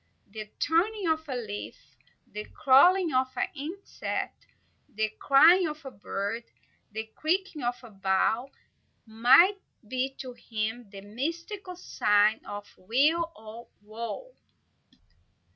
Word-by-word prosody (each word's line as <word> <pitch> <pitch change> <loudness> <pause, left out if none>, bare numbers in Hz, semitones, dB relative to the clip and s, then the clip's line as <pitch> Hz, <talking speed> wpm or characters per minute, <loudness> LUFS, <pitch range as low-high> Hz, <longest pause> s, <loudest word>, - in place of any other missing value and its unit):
The 215 0 -7
turning 370 +5 +1
of 320 -1 0
a 260 - -2
leaf, 215 -4 -7 0.3
the 210 0 -7
crawling 315 +4 +4
of 260 0 +3
an - - 0
insect, 325 +8 -5 0.4
the 220 +1 -1
cry 310 +6 +7
of 300 -1 -9
a 270 - -6
bird, 205 +3 -4 0.5
the 220 +1 -4
creaking 350 0 -1
of 245 0 -1
a 235 - -12
bough, 195 +6 +1 0.6
might 260 - +5 0.3
be 260 +3 -2
to 255 -2 -7
him 225 -1 -4
the 195 -1 -10
mystic 330 - -5
signal 210 - +2
of 205 0 -11
weal 295 - +2
or 220 +2 -11 0.2
woe. 230 - -6
255 Hz, 120 wpm, -28 LUFS, 215-320 Hz, 0.6 s, cry